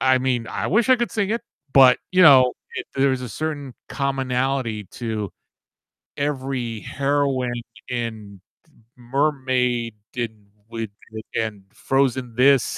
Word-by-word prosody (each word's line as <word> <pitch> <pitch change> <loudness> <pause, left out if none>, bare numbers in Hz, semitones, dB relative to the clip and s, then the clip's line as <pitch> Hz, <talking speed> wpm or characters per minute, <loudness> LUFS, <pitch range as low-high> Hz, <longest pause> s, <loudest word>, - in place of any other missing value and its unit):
I 130 0 +4
mean 125 -3 0
I 105 +1 -3
wish 215 - +2
I 255 - +7
could 240 -1 -1
sing 205 -2 -1
it, 230 +2 0 0.3
but, 130 -2 +7
you 185 0 +5
know, 130 -6 +8 0.2
it - - -4
there's 135 -1 +2
a 125 - -5
certain 145 +2 -4 0.2
commonality 130 -4 -1
to 110 -4 -3 0.9
every 130 -5 -2
heroine 135 -3 0 0.3
in 110 -5 -5 0.3
d - - -25 0.2
Mermaid, 125 -3 0 0.2
in, 110 -4 -4 0.2
with 115 -2 -5 0.2
within 110 -2 -4
Frozen 130 -3 0
this, 135 +1 +4
130 Hz, 125 wpm, -22 LUFS, 115-140 Hz, 0.9 s, know